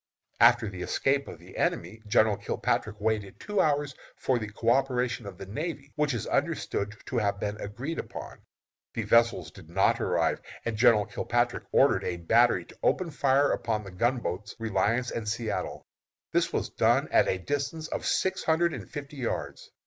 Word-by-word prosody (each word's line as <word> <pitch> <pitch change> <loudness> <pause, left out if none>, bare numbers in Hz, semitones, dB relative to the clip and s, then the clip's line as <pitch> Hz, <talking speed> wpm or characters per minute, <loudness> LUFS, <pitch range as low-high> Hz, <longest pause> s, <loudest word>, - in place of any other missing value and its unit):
"After 120 0 +6
the 95 -3 -6
escape 135 +8 +1
of - - -8
the - - -15
enemy, 110 - -1
General 105 0 +4
Kilpatrick 105 - -2
waited 105 -2 -1
two 210 -1 0
hours 145 -2 +1 0.2
for 130 -2 0
the 105 -1 -5
coöperation 125 0 +1
of 95 -3 -8
the 95 - -7
navy, 140 - -5
which 150 -3 +1
is 115 - -3
understood 105 +2 -1
to 125 - -1
have 100 -2 0
been 105 +1 -3
agreed 125 +11 -4
upon. - - -7 0.6
The 115 - -1
vessels 115 +2 +3
did 90 -5 -14
not 95 +3 +2
arrive, - - +1 0.2
and 115 - -1
General 110 -2 +5
Kilpatrick - - -1
ordered - - +4
a 90 -1 -2
battery 110 +1 +3
to - - -17
open 180 -3 +1
fire 140 0 +3
upon 110 -2 -1
the 95 - -9
gunboats 105 -1 -1
Reliance 115 +2 0
and 110 -2 -3
Satellite. 115 0 -3 0.5
This - - +2
was - - -2
done - - +3
at - - +5
the 95 - +1
distance 145 - -3
of - - -4
six 190 - +1
hundred 165 +1 +2
and - - -7
fifty 145 -1 -7
yards. 80 - -4
115 Hz, 170 wpm, -28 LUFS, 105-140 Hz, 0.6 s, After